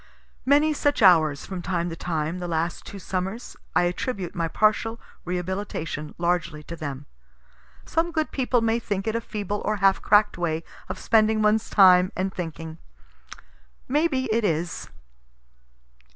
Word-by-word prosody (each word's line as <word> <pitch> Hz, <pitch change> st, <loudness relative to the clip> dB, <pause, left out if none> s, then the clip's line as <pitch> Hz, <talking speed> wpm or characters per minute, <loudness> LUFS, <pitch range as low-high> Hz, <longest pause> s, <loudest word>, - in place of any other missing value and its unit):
Many 295 Hz, +3 st, +4 dB
such 290 Hz, -5 st, +1 dB
hours, 155 Hz, -6 st, +5 dB
from 185 Hz, -2 st, -5 dB
time 175 Hz, -1 st, -1 dB
to -, -, -5 dB
time, 165 Hz, 0 st, -3 dB
the 175 Hz, -, -4 dB
last 165 Hz, 0 st, -2 dB
two 200 Hz, -, -8 dB
summers 190 Hz, +5 st, -4 dB, 0.2 s
I -, -, +4 dB
attribute 180 Hz, +1 st, -2 dB
my 165 Hz, -2 st, -1 dB
partial 215 Hz, +5 st, +1 dB, 0.3 s
rehabilitation 180 Hz, -4 st, -4 dB
largely 170 Hz, -3 st, -1 dB
to 170 Hz, -, -7 dB
them. 145 Hz, -3 st, -6 dB, 0.8 s
Some 335 Hz, +1 st, 0 dB
good 315 Hz, -2 st, -1 dB
people 250 Hz, -2 st, +1 dB
may 225 Hz, +1 st, +1 dB
think 200 Hz, -4 st, -3 dB
it 220 Hz, 0 st, -1 dB
a 230 Hz, -, 0 dB
feeble 205 Hz, -2 st, -4 dB
or 215 Hz, -, 0 dB
half 195 Hz, -1 st, +3 dB
crack'd 210 Hz, -2 st, +4 dB
way 165 Hz, -2 st, -1 dB, 0.3 s
of -, -, -4 dB
spending 220 Hz, -1 st, +3 dB
one's 215 Hz, +1 st, +2 dB
time 185 Hz, -2 st, +6 dB
and 190 Hz, +1 st, -2 dB
thinking. 165 Hz, -2 st, -6 dB, 1.1 s
May 300 Hz, +5 st, +2 dB
be 265 Hz, -5 st, -1 dB
it 230 Hz, 0 st, +1 dB
is. 165 Hz, -3 st, -2 dB
190 Hz, 150 wpm, -25 LUFS, 170-220 Hz, 1.1 s, time